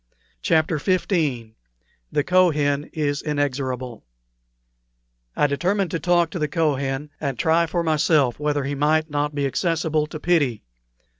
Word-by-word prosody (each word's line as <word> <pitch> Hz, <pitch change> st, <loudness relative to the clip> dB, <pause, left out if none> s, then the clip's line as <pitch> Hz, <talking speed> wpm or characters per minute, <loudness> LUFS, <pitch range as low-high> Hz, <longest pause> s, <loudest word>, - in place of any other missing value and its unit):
CHAPTER 160 Hz, -, +1 dB
XV 185 Hz, +4 st, 0 dB, 1.0 s
THE 145 Hz, -, +1 dB
KOHEN 150 Hz, -6 st, +2 dB
IS 145 Hz, -2 st, -1 dB
INEXORABLE 130 Hz, -5 st, -3 dB, 1.3 s
I -, -, +3 dB
determined 180 Hz, +6 st, 0 dB
to 165 Hz, -, -2 dB
talk 175 Hz, 0 st, +2 dB
to 180 Hz, -, -4 dB
the 150 Hz, -, 0 dB
Kohen, 145 Hz, -2 st, -1 dB
and 140 Hz, -4 st, -3 dB
try 165 Hz, +4 st, +2 dB
for 170 Hz, +1 st, -1 dB
myself 150 Hz, -5 st, +2 dB
whether 145 Hz, -1 st, 0 dB
he 140 Hz, +2 st, -3 dB
might 155 Hz, +2 st, +1 dB
not 145 Hz, 0 st, -1 dB
be 140 Hz, -1 st, 0 dB
accessible 155 Hz, +1 st, 0 dB
to 155 Hz, 0 st, -7 dB
pity. 145 Hz, -10 st, +1 dB
150 Hz, 135 wpm, -23 LUFS, 140-165 Hz, 1.3 s, I